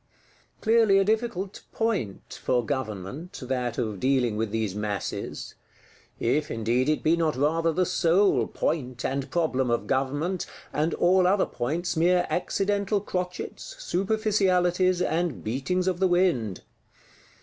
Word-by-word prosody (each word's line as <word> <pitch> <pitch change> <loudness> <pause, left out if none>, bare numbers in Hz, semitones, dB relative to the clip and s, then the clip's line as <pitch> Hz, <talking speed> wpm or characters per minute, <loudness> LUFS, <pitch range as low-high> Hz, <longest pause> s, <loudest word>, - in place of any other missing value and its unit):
Clearly 220 -3 +4
a 195 - +5
difficult 210 -2 -1
"point" 205 - -2
for 125 -2 +1
Government, 130 - -4
that 125 -2 -2
of 110 -4 -2
dealing 130 -3 +2
with 110 0 -1
these 110 -2 -1
masses;—if 105 +6 -4
indeed 120 +4 0
it 155 - 0
be 160 +2 +4
not 165 -2 0
rather 165 +5 +2
the 180 +3 +1
sole 180 +3 +3
point 130 -5 -2
and 135 +1 -2
problem 135 -7 0
of 120 - 0
Government, 145 +7 -1 0.3
and 155 +3 0
all 180 +1 +4
other 195 +1 +3
points 165 +8 -2
mere 175 +2 +3
accidental 200 +2 0
crotchets, 180 - -5
superficialities, 185 - +1
and 170 -4 -1
beatings 140 +11 -1
of 180 -2 0
the 190 - +4
wind! 175 - +1
165 Hz, 125 wpm, -26 LUFS, 125-185 Hz, 0.3 s, a